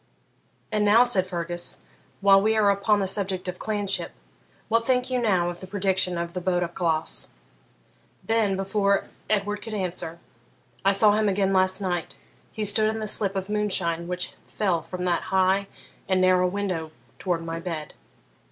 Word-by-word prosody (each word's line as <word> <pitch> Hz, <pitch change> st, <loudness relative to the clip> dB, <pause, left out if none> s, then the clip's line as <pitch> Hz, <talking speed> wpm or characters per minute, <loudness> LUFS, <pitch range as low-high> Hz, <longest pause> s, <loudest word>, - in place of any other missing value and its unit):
'And 210 Hz, -1 st, +1 dB
now,' 215 Hz, +4 st, +6 dB
said 195 Hz, -7 st, +1 dB
Fergus, 175 Hz, -1 st, -4 dB, 0.4 s
'while 195 Hz, 0 st, +6 dB
we 220 Hz, +2 st, +2 dB
are 205 Hz, -2 st, +4 dB
upon 200 Hz, +1 st, +2 dB
the 195 Hz, -, 0 dB
subject 190 Hz, -1 st, -1 dB
of 180 Hz, 0 st, -5 dB
clanship 205 Hz, -2 st, -1 dB, 0.6 s
what 230 Hz, +1 st, +2 dB
think 250 Hz, +1 st, 0 dB
you 250 Hz, -1 st, +1 dB
now 185 Hz, -6 st, +2 dB
of 175 Hz, -, -10 dB
the 185 Hz, -, -9 dB
prediction 190 Hz, -2 st, 0 dB
of 170 Hz, 0 st, -4 dB
the 180 Hz, -, -4 dB
Bodach 175 Hz, -1 st, -1 dB
Glas?' 165 Hz, -3 st, 0 dB, 1.0 s
Then, 220 Hz, -3 st, +1 dB
before 200 Hz, 0 st, +1 dB, 0.3 s
Edward 205 Hz, 0 st, 0 dB
could 220 Hz, 0 st, -6 dB
answer, 180 Hz, -4 st, -2 dB, 0.7 s
'I 195 Hz, -, +4 dB
saw 205 Hz, +1 st, +5 dB
him 210 Hz, 0 st, +2 dB
again 195 Hz, 0 st, +1 dB
last 185 Hz, +1 st, +2 dB
night: 175 Hz, -4 st, -3 dB, 0.4 s
he 215 Hz, -, -4 dB
stood 215 Hz, +2 st, +5 dB
in 220 Hz, 0 st, -3 dB
the 215 Hz, -, -3 dB
slip 200 Hz, -2 st, +1 dB
of 190 Hz, 0 st, -3 dB
moonshine 185 Hz, -5 st, 0 dB
which 180 Hz, 0 st, -3 dB
fell 185 Hz, -6 st, 0 dB
from 180 Hz, +3 st, -6 dB
that 175 Hz, -1 st, 0 dB
high 190 Hz, +1 st, +2 dB, 0.4 s
and 185 Hz, -1 st, +3 dB
narrow 185 Hz, 0 st, +4 dB
window 180 Hz, -4 st, -3 dB, 0.3 s
towards 175 Hz, -3 st, -1 dB
my 165 Hz, 0 st, -4 dB
bed. 165 Hz, -3 st, -5 dB
195 Hz, 170 wpm, -25 LUFS, 180-210 Hz, 1.0 s, now